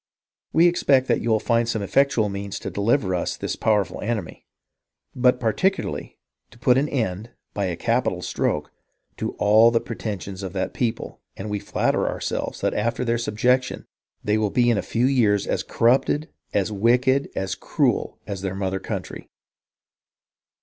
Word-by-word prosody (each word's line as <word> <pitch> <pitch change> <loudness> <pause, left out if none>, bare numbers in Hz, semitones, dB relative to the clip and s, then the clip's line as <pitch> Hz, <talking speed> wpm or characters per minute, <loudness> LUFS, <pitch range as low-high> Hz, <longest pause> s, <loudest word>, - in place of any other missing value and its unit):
AVe 165 - +6
expect 140 -7 +3
that - - +1
you 120 - -2
will 110 -1 +3
find 115 0 +1
some 110 -3 -1
effectual 130 0 +2
means 100 0 -5
to - - -6
deliver 100 -1 +1
us 90 - -1
from - - -29
this - - -2
powerful 105 -3 0
enemy, 105 -5 -4 0.7
but 125 0 +3
particularly 185 - -1 0.3
to - - -18
put 125 +1 +3
an 140 +3 +1
end, 110 -4 -2 0.2
by 100 - -1
a 90 -2 -2
capital 115 -2 0
stroke, - - -1 0.5
to - - -3
all 110 +3 +5
the 115 0 +2
pretensions 100 -5 -6
of 95 -2 -5
that 95 - -2
people, 115 -2 -3 0.2
and 105 +2 -5
we 105 - -1
flatter - - 0
ourselves - - -3
that - - +1
after 115 +4 -1
their 120 0 +1
subjection 125 +3 0 0.4
they 105 +1 +1
will 105 -1 +1
be 120 +2 +3
in 115 - +1
a - - 0
feu 120 +2 0
years 115 -7 +3
as - - -1
corrupted, 135 +6 +1 0.2
as 100 +1 0
wicked, 125 +6 +2
as 95 0 -2
cruel - - 0
as 100 -3 -5
their 95 -1 -3
mother 95 -1 -2
country. - - -6
115 Hz, 170 wpm, -23 LUFS, 100-125 Hz, 0.7 s, AVe